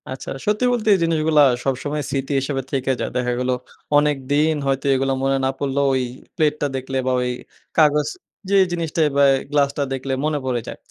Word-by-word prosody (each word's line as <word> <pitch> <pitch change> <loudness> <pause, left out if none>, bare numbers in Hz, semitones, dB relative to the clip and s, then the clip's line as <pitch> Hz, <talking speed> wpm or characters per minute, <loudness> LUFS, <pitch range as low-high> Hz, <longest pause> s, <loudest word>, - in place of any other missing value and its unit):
আচ্ছা 130 0 -7 0.2
সত্যি 210 +4 +1
বলতে 230 -3 -2
এই 195 - +3
জিনিসগুলা 160 -2 +3 0.2
সবসময় 145 +3 -2
স্মৃতি 135 +1 -2
হিসেবে 135 0 -2
থেকে 135 -1 0
যায়। - - -3
দেখা 125 -1 0
গেল, 125 0 -1 0.5
অনেকদিন 145 +1 +2
হয়তো 135 0 -1
এগুলা 135 0 0
মনে 135 0 +2
না - - +2
পড়লেও 140 0 0
ওই 130 -1 +1 0.3
প্লেটটা 150 -2 +1
দেখলে 130 0 -3
বা - - +2
ওই 125 - -1 0.5
কাগজ 150 -2 +4 0.4
যে 200 - +4
জিনিসটা 165 -2 -1 0.2
বা 140 - +6 0.3
গ্লাসটা 145 0 +1
দেখলে 135 0 -3
মনে 155 -1 0
পড়ে 125 -2 -1
যায়। - - -7
140 Hz, 175 wpm, -21 LUFS, 135-155 Hz, 0.5 s, বা